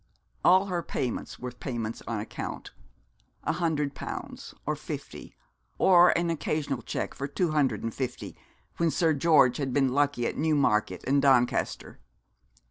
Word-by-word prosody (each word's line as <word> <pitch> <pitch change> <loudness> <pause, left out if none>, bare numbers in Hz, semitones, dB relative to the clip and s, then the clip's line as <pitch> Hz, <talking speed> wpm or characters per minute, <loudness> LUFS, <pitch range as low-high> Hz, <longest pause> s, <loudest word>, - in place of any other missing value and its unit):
All 185 +2 +6
her 180 -3 -2
payments 125 -6 -4
were 125 0 -6
payments 120 -3 -5
on 115 -2 -2
account. 105 - -6 0.7
A - - 0
hundred 150 -5 -1
pounds; - - -7
or - - 0
fifty - - -8 0.4
or 175 -2 +6
an 170 0 0
occasional 150 -4 -2
cheque - - -4
for 140 - -4
two 170 +3 -1
hundred 145 -4 +1
and 115 -1 -3
fifty, 130 -2 -5 0.4
when 170 -1 +2
Sir 160 0 +2
George 145 -4 +4
had 135 -3 -2
been 135 -1 +3
lucky 140 -3 +1
at - - -2
Newmarket 135 - +1
and 140 +1 +3
Doncaster. 130 - +1
140 Hz, 145 wpm, -28 LUFS, 125-160 Hz, 0.7 s, All